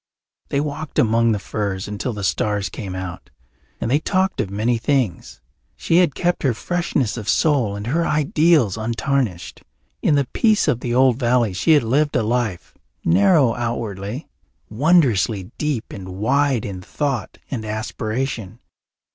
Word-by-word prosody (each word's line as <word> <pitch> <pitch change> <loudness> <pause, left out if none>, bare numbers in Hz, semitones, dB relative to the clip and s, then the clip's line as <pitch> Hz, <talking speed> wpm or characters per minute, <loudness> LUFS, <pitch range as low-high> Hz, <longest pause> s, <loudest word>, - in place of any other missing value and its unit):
They 140 - 0
walked 150 +1 -4
among 115 0 +3
the 105 - +1
firs 100 -2 -3
until 105 +5 -3
the 105 -3 -6
stars 100 +4 0
came 95 -6 -6
out, 95 -1 -7 0.5
and 115 - -2
they 145 - +4
talked 190 +3 0
of 105 - -4
many 110 +4 0
things. 125 - -1 0.3
She 165 - +1
had 175 -6 +3
kept 175 0 0
her 130 -5 +1
freshness 145 -6 -1
of 110 -2 -5
soul 130 -10 +2
and 100 0 -6
her 160 +8 +1
ideals 150 - +3
untarnished. 115 -3 -2 0.4
In 150 - +3
the 140 -1 +2
peace 215 -5 +3
of 130 -6 +2
the 120 -1 -2
old 130 -1 +4
valley 120 -4 +2
she 95 - +3
had 145 -4 +4
lived 145 +6 +1
a 125 - +2
life, 110 -5 -2 0.3
narrow 115 - +4
outwardly, 115 - -4 0.4
wondrously 115 - +2
deep 145 -7 -2
and 95 -2 -8
wide 130 +6 +1
in 95 -3 -6
thought 135 +3 -3
and 120 -5 -3
aspiration. 110 0 -3
120 Hz, 155 wpm, -21 LUFS, 105-145 Hz, 0.5 s, they